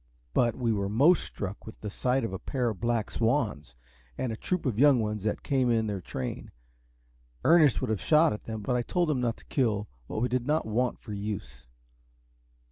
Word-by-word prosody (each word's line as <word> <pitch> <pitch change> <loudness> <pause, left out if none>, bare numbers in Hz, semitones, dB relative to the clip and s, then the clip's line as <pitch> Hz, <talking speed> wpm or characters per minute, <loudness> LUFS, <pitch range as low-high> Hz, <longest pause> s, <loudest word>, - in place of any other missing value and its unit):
But 120 -2 +2
we 120 -3 0
were 100 -1 -1
most 145 - +4
struck 100 +1 -6
with 110 - -10
the 105 - -5
sight 130 +5 0
of 115 - -3
a 95 - -4
pair 125 -3 -1
of 110 - -5
black 115 -2 0
swans, 110 - 0 0.4
and 125 - -2
a - - -3
troop 180 +9 -2
of 120 -5 -1
young 140 -2 +6
ones 105 -2 -2
that 105 - -1
came 130 -3 +1
in 115 -1 +2
their 100 -3 -3
train. 65 -7 -5 1.0
Ernest 155 -6 +5
would 130 -4 -1
have 110 - -1
shot 155 -2 +4
at 105 - -8
them, 110 -1 -5
but 125 +3 0
I 120 - +2
told 175 +6 0
him 130 -4 0
not 115 -2 0
to - - -18
kill 110 -6 0 0.2
what - - -3
we 120 - +1
did 125 -1 -1
not 155 +2 +1
want 120 +3 0
for 105 - -9
use. 100 - -6
115 Hz, 210 wpm, -28 LUFS, 105-130 Hz, 1.0 s, young